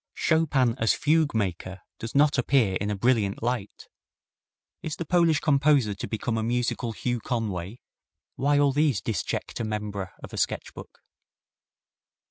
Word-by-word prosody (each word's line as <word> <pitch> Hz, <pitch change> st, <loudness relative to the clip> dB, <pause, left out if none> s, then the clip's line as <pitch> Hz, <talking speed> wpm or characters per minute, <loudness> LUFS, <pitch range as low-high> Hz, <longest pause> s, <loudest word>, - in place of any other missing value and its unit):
Chopin 145 Hz, -7 st, +2 dB
as 110 Hz, -, +3 dB
fugue 155 Hz, -2 st, +2 dB
maker 95 Hz, -2 st, -3 dB, 0.2 s
does 115 Hz, +3 st, -7 dB
not 145 Hz, 0 st, +4 dB
appear 125 Hz, -7 st, +2 dB
in 105 Hz, -, -1 dB
a 105 Hz, -, -1 dB
brilliant 110 Hz, -2 st, +1 dB
light. 120 Hz, -4 st, -3 dB, 0.9 s
Is 160 Hz, -1 st, -4 dB
the 170 Hz, -, -5 dB
Polish 170 Hz, -2 st, +3 dB
composer 140 Hz, -6 st, +3 dB
to 100 Hz, -, -6 dB
become 115 Hz, +1 st, -2 dB
a -, -, -2 dB
musical 120 Hz, 0 st, -1 dB
Hugh 120 Hz, +1 st, -2 dB
Conway? 110 Hz, -3 st, -4 dB, 0.5 s
Why 145 Hz, +1 st, +2 dB
all 145 Hz, -1 st, +4 dB
these 145 Hz, -5 st, +2 dB
disjecta 105 Hz, +3 st, -3 dB
membra 105 Hz, -3 st, -4 dB
of -, -, -9 dB
a -, -, -6 dB
sketch -, -, -2 dB
book? -, -, -12 dB
120 Hz, 145 wpm, -26 LUFS, 105-145 Hz, 0.9 s, not